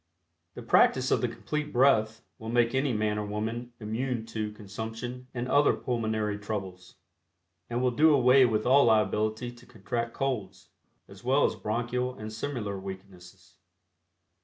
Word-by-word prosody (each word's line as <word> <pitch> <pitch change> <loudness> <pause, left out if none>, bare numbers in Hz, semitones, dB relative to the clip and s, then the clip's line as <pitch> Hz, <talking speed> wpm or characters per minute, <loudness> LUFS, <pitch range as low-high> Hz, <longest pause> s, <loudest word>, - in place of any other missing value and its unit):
The - - -8
practice - - +3
of - - +3
the - - +1
Complete 150 0 -4
Breath 115 -4 +3 0.2
will 110 - -7
make 120 0 +2
any 135 +1 +1
man 105 -1 0
or 105 - -3
woman 115 +4 -4
immune 115 +2 -3
to 110 -1 -2
Consumption 110 +5 -7
and 120 -1 -4
other 145 +3 +4
pulmonary 110 -4 -2
troubles, 95 -4 -6 0.7
and 120 +1 -1
will 125 - +3
do 155 +6 +5
away 130 -1 +6
with 110 -2 -1
all 135 +3 +6
liability 110 +2 +1
to 120 0 -17
contract 120 -1 -4
"colds," 130 -9 -3 0.4
as 100 +2 -14
well 135 +4 +3
as - - +1
bronchial 120 +3 -2
and 110 0 -7
similar 110 -5 -4
weaknesses. 95 -2 -11
115 Hz, 150 wpm, -28 LUFS, 105-125 Hz, 0.7 s, away